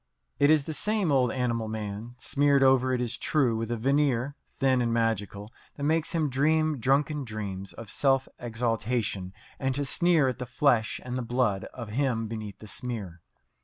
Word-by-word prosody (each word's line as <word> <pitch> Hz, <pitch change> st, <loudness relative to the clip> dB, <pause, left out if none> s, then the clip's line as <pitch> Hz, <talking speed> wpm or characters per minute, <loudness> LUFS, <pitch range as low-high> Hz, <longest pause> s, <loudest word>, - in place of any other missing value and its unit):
It 145 Hz, -, +5 dB
is 155 Hz, -2 st, +5 dB
the 160 Hz, -, -5 dB
same 210 Hz, -1 st, 0 dB
old 130 Hz, -3 st, +3 dB
animal 120 Hz, -3 st, -1 dB
man, 110 Hz, +2 st, -5 dB
smeared 140 Hz, +1 st, +2 dB
over, 130 Hz, -1 st, +4 dB
it 125 Hz, -1 st, 0 dB
is 120 Hz, -2 st, -3 dB
true, 130 Hz, -7 st, +2 dB
with 115 Hz, 0 st, -3 dB
a 120 Hz, -, -1 dB
veneer, 135 Hz, +1 st, +1 dB
thin 130 Hz, -2 st, +1 dB
and 120 Hz, -1 st, 0 dB
magical, 110 Hz, -2 st, -1 dB, 0.2 s
that 140 Hz, -, -6 dB
makes 160 Hz, +2 st, +1 dB
him 160 Hz, -3 st, +1 dB
dream 155 Hz, +2 st, +2 dB
drunken 140 Hz, +4 st, +1 dB
dreams 100 Hz, -4 st, -5 dB
of 115 Hz, -3 st, -9 dB
self 135 Hz, -1 st, +2 dB
exaltation 115 Hz, -4 st, -1 dB, 0.3 s
and 135 Hz, -1 st, 0 dB
to 145 Hz, 0 st, 0 dB
sneer 165 Hz, 0 st, +3 dB
at 130 Hz, -1 st, -2 dB
the 125 Hz, -, -5 dB
flesh 120 Hz, -3 st, +2 dB
and 125 Hz, 0 st, -3 dB
the -, -, -2 dB
blood 120 Hz, -5 st, 0 dB
of 120 Hz, -4 st, -8 dB
him 120 Hz, -1 st, 0 dB
beneath 110 Hz, -3 st, -6 dB
the 110 Hz, -, -12 dB
smear. 100 Hz, -8 st, -6 dB
125 Hz, 180 wpm, -28 LUFS, 115-140 Hz, 0.3 s, It